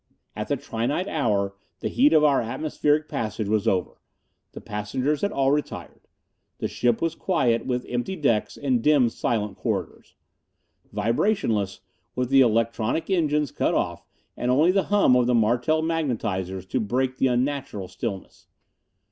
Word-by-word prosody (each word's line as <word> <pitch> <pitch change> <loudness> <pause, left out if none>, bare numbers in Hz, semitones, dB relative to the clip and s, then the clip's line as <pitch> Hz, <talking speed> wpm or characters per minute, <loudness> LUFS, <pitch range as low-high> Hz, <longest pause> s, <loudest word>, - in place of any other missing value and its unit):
At - - -4
the - - 0
trinight 130 - -2
hour 105 - 0 0.3
the - - -1
heat 280 +4 +3
of 155 - +5
our 145 -3 +4
atmospheric 150 +4 0
passage 110 -6 -3
was 105 -1 0
over. 90 -3 -1 0.5
The - - -8
passengers 125 +8 -2
had 200 - 0
all 135 0 +2
retired. 150 0 -4 0.5
The - - -2
ship 120 +2 0
was 165 -1 0
quiet, 130 -11 0
with 125 -1 -1
empty 120 +10 -2
decks 130 - 0
and 130 -4 0
dim, 140 -3 +4
silent 105 -3 -2
corridors. 95 -8 -4 0.8
Vibrationless, 110 - 0 0.3
with 125 -1 -1
the 135 0 +6
electronic 115 - +1
engines 150 -5 +1
cut - - 0
off - - -1 0.3
and 125 - -2
only 150 +8 +4
the 195 0 +1
hum 200 -11 +4
of 125 -1 +3
the 125 - +3
Martel 120 +8 +2
magnetizers 105 - -2
to 130 - 0
break 130 +4 -1
the 135 - +3
unnatural 130 -5 -1
stillness. 100 -1 -6
125 Hz, 150 wpm, -24 LUFS, 110-150 Hz, 0.8 s, the